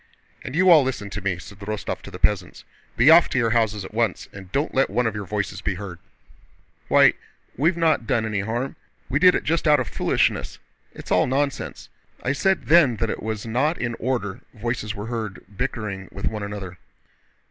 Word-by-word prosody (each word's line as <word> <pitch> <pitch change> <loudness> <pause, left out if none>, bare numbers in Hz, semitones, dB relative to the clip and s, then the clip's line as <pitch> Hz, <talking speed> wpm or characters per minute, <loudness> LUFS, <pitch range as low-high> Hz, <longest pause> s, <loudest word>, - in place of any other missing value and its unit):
"And 130 - -6
you 185 +1 +5
all 160 -3 +8
listen 120 -7 -3
to 100 +2 -5
me!" 95 -2 -1
said 95 +2 -12
Rostóv 105 +1 -4
to - - -10
the - - -8
peasants. 95 -4 0 0.3
"Be 130 +7 +7
off 165 +1 +7
to - - -2
your 115 -2 +2
houses 110 -4 +1
at 95 - -11
once, 115 -4 0
and 95 -2 -11
don't 145 +3 -1
let 135 - +2
one 120 +5 0
of 115 - 0
your 100 -2 -5
voices 100 0 -3
be 95 0 -1
heard!" 90 -2 -8 0.9
"Why, - - +6 0.4
we've 165 +6 +2
not 160 -8 +2
done 110 -1 +1
any 105 -2 -1
harm! 120 +6 -3 0.3
We 140 - +1
did 180 +1 +6
it - - -1
just 165 +2 0
out 150 -1 +6
of - - -2
foolishness. - - 0 0.3
It's - - -11
all 90 - +4
nonsense.... 140 +2 -2 0.4
I 130 - +1
said 190 +7 +1
then 150 -6 +5
that 115 0 -1
it - - -5
was 110 -1 -4
not 130 +9 0
in 120 0 -2
order," 120 -6 -2
voices 110 -1 -3
were 105 0 -6
heard 110 -4 -5
bickering 105 -5 -4
with 100 - -6
one 105 -1 -2
another. 100 -3 -6
115 Hz, 200 wpm, -23 LUFS, 100-135 Hz, 0.9 s, all